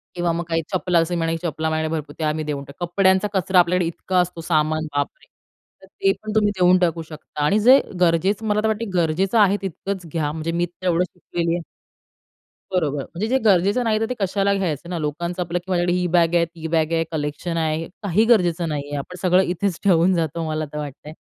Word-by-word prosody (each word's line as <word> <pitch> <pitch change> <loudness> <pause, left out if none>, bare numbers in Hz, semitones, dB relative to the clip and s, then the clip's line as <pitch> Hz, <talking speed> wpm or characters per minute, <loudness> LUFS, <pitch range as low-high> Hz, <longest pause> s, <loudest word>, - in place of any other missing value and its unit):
किंवा 175 -1 0
मग 170 +1 -2
काही 165 0 0
चपला 180 -2 +1
असे 165 +1 +1
म्हणाले 165 -1 0
की 170 +1 -5
चपला 160 0 -2
भरपूर 155 -1 -2
ते 160 - -2
आम्ही 155 0 -1
देऊन 145 -2 -4
टाकू. 145 +6 -6
कपड्यांचा 190 +2 +3
कचरा 190 0 +2
आपल्याकडे 175 0 +2
इतका 180 +2 -2
असतो 175 -1 -2
सामान, 155 -1 0
बापरे! 145 0 -3 0.6
तर - - -14
ते 390 -1 0
पण 215 0 -5
तुम्ही 210 -1 +3
देऊन 180 0 +5
टाकू 170 -2 0
शकता 155 -1 -8
आणि 195 +8 +3
जे 255 +5 +7 0.2
गरजेचं 185 +5 +2
मला 210 0 +2
तर - - +1
वाटते 220 +1 -1
गरजेचं 180 +5 +1
आहे 205 -1 +5
तितकंच 190 0 -5
घ्या 155 -3 -1
म्हणजे 160 +1 -3
मी 175 - +2
तेवढं 175 0 0
शिकलेली 170 -1 -2
आहे 175 - -4 1.1
बरोबर. 150 -6 0
म्हणजे 185 +6 -4
जे 260 +3 +2
गरजेचं 200 +4 +3
नाही 215 -1 +2
तर 225 - +1
ते - - 0
कशाला 195 +1 +1
घ्यायचं 175 -3 -2
ना 175 - -2
लोकांचं 170 +4 -3
आपलं 175 +1 -2
की 175 - -16
माझ्याकडे 175 -1 +1
ही 180 0 +1
बॅग 170 -1 +2
आहे, 170 - +4
ती 165 -1 -9
बॅग 160 0 +1
आहे 165 0 +2
कलेक्शन 150 +3 -3
आहे. 160 0 -1 0.2
काही 205 +2 +2
गरजेचं 180 -7 +2
नाही 150 -2 -2
आहे. 145 0 -5
आपण 180 +6 -7
सगळं 185 0 +4
इथेच 180 0 -1
ठेवून 185 -1 +4
जातो, 165 -1 -1
मला 155 0 -2
तर 150 - -4
वाटतंय, 150 +1 -7
175 Hz, 215 wpm, -22 LUFS, 160-190 Hz, 1.1 s, जे